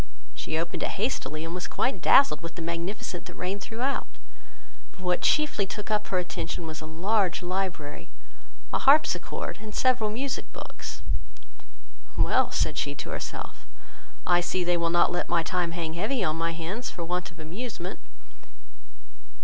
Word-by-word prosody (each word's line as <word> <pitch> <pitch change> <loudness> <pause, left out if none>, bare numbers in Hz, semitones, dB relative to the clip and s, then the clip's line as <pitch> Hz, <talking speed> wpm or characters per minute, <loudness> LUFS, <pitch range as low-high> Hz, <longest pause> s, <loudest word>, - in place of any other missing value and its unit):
She 160 - -2
opened 170 +1 -2
it - - -1
hastily, 160 - -1
and 165 - -4
was 180 0 -3
quite 260 - 0
dazzled 225 - +6
with 165 -1 -6
the 170 - -4
magnificence 170 +2 -3
that - - -9
reigned 190 +3 -2
throughout; 245 +7 -1 0.9
but 195 - -15
what 180 -1 +2
chiefly 300 -10 +3
took 210 +2 -5
up 210 -1 +1
her 185 - +1
attention, 175 -1 -2
was 155 -1 -5
a 155 - -7
large 185 +3 +1
library, 180 -5 -2 0.6
a - - +3
harpsichord, 280 +3 +3
and 215 -1 -7
several 255 -5 +3
music 260 +5 -2
books. - - -7 1.1
"Well, - - +4
(said - - +1
she - - -1
to - - -5
herself,) - - -5 0.6
I 175 -1 +5
see 180 +1 0
they 175 0 +3
will 170 -1 +2
not 175 +1 +5
let 175 - -1
my 170 -1 +3
time 175 0 0
hang 165 -2 -2
heavy 210 +7 0
on 155 -3 +2
my 165 0 0
hands 175 +9 -3
for 170 - -5
want 180 +1 -1
of 175 - -17
amusement." 185 +3 -5
180 Hz, 165 wpm, -28 LUFS, 170-210 Hz, 1.1 s, dazzled